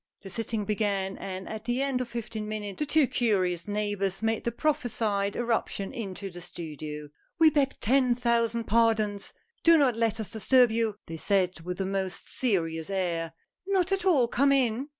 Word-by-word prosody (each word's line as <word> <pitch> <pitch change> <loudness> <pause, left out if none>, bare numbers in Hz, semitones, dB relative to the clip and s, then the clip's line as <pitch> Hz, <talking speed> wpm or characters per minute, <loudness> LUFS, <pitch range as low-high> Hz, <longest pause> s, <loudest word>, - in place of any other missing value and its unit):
The 195 - -8
sitting 225 0 -2
began, 200 -2 0
and 190 -1 -6
at 220 0 -6
the 245 +3 0
end 270 -2 0
of 250 - -3
fifteen 220 -2 -5
minutes, 205 -2 -4
the 300 - -1
two 310 0 +5
curious 185 -9 0
neighbors 205 -1 -1
made 225 0 0
the 235 - +1
prophesied 220 -7 0
erup 240 -1 0
tion 195 +5 -5
into 200 -5 -5
the 175 0 -9
studio. 155 -3 -7 0.3
"We 320 -1 +7
beg 275 -2 +1
ten 250 +1 +3
thousand 235 -1 +1
pardons! 220 -2 +1 0.3
Do 335 0 +7
not 270 -6 +3
let 225 -1 0
us 220 - -5
disturb 245 +2 +4
you," 225 -2 0
they 165 - -7
said 185 -1 +1
with 180 +2 -5
a 190 - 0
most 190 -1 -3
serious 165 -9 0
air. 170 -4 -1 0.3
"Not 385 -2 +1
at 390 -1 +1
all, 305 -11 +4
come 275 +4 +2
in! 260 0 +1
220 Hz, 180 wpm, -28 LUFS, 195-245 Hz, 0.3 s, We